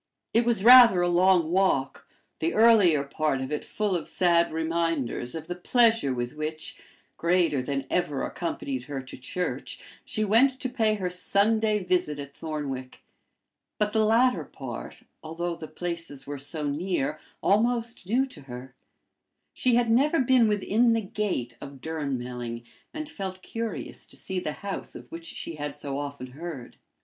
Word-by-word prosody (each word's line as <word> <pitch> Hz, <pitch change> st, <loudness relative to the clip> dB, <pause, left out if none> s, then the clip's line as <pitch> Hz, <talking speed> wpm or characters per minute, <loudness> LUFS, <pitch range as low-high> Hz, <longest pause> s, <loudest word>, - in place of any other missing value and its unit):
It 230 Hz, +1 st, +3 dB
was 230 Hz, -5 st, +1 dB
rather 235 Hz, -6 st, +9 dB
a 175 Hz, -, +2 dB
long 175 Hz, -1 st, +4 dB
walk, 180 Hz, -8 st, +1 dB, 0.3 s
the 165 Hz, +1 st, -1 dB
earlier 210 Hz, -10 st, +6 dB
part 140 Hz, 0 st, -1 dB
of 130 Hz, +2 st, -4 dB
it 150 Hz, -, -2 dB
full 210 Hz, -3 st, -1 dB
of 170 Hz, -, -4 dB
sad 170 Hz, -2 st, +3 dB
reminders 160 Hz, -6 st, -1 dB
of 160 Hz, -1 st, -5 dB
the 175 Hz, -, -4 dB
pleasure 225 Hz, -, +3 dB
with 120 Hz, 0 st, -3 dB
which, 155 Hz, +1 st, -5 dB, 0.4 s
greater 170 Hz, -5 st, +2 dB
than 135 Hz, +1 st, -3 dB
ever 150 Hz, -6 st, 0 dB
accompanied 135 Hz, -7 st, -4 dB
her 140 Hz, 0 st, -4 dB
to 130 Hz, 0 st, -9 dB
church, 180 Hz, +8 st, -4 dB, 0.2 s
she 245 Hz, -7 st, -2 dB
went 255 Hz, +6 st, +4 dB
to 255 Hz, -, -2 dB
pay 220 Hz, -4 st, +1 dB
her 185 Hz, -3 st, -3 dB
Sunday 210 Hz, +3 st, +2 dB
visit 180 Hz, -5 st, 0 dB
at 140 Hz, -1 st, -8 dB
Thornwick; 140 Hz, -5 st, -5 dB, 0.7 s
but 210 Hz, 0 st, 0 dB
the 220 Hz, -1 st, +3 dB
latter 235 Hz, +4 st, +3 dB
part, -, -, -8 dB, 0.2 s
although 170 Hz, +2 st, -3 dB
the 165 Hz, -2 st, -8 dB
places 165 Hz, -5 st, -5 dB
were 145 Hz, 0 st, -6 dB
so 145 Hz, +2 st, -3 dB
near, 150 Hz, -1 st, -1 dB, 0.2 s
almost 230 Hz, -1 st, +1 dB
new 255 Hz, +5 st, +3 dB
to 255 Hz, -, -12 dB
her: 125 Hz, -1 st, -9 dB, 0.8 s
she 250 Hz, -2 st, +2 dB
had 235 Hz, -1 st, +2 dB
never 290 Hz, +7 st, +3 dB
been 255 Hz, -3 st, +4 dB
within 215 Hz, +3 st, +2 dB
the 225 Hz, -, +1 dB
gate 190 Hz, -, -3 dB
of 140 Hz, -1 st, -9 dB
Durnmelling, 125 Hz, -6 st, -4 dB, 0.3 s
and 310 Hz, -1 st, -5 dB
felt 190 Hz, -, -6 dB
curious 230 Hz, -2 st, -4 dB
to -, -, -10 dB
see 190 Hz, -1 st, -2 dB
the 155 Hz, -4 st, -3 dB
house 195 Hz, -, -4 dB
of -, -, -11 dB
which 165 Hz, 0 st, -8 dB
she 165 Hz, -1 st, -6 dB
had 145 Hz, -1 st, -5 dB
so 140 Hz, -1 st, -4 dB
often 140 Hz, -3 st, -6 dB
heard. 145 Hz, -3 st, -8 dB
175 Hz, 160 wpm, -27 LUFS, 145-215 Hz, 0.8 s, rather